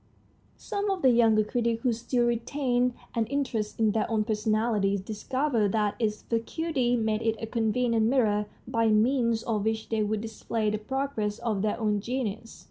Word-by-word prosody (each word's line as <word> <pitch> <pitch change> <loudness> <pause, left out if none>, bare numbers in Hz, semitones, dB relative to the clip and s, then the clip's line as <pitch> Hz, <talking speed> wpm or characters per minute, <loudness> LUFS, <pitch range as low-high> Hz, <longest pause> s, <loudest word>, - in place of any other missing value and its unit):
Some 405 0 -3
of 385 -2 -2
the 260 - +6
younger 225 -2 +4
critics, 230 +1 -1
who 250 -3 +2
still 240 +1 0
retained 245 +1 0 0.2
an 230 -2 0
interest 240 -6 -2
in 220 -2 +3
their 220 0 0
own 220 -2 +1
personalities, 215 -2 +1
discovered 220 +2 -1
that 210 -2 +1
its 215 -2 -1
vacuity 245 +2 -1
made 220 -2 0
it 225 -1 +1
a - - -3
convenient 225 0 +1
mirror 215 -5 +2 0.2
by 230 0 +1
means 230 +1 +2
of 215 -3 -1
which 220 0 -2
they 220 -1 0
would 210 0 -1
display 220 -1 -2
the 215 - -2
progress 220 -3 -2
of 225 -5 -2
their 215 +2 -1
own 210 -2 +1
genius. 225 -1 -4
225 Hz, 170 wpm, -27 LUFS, 215-245 Hz, 0.2 s, the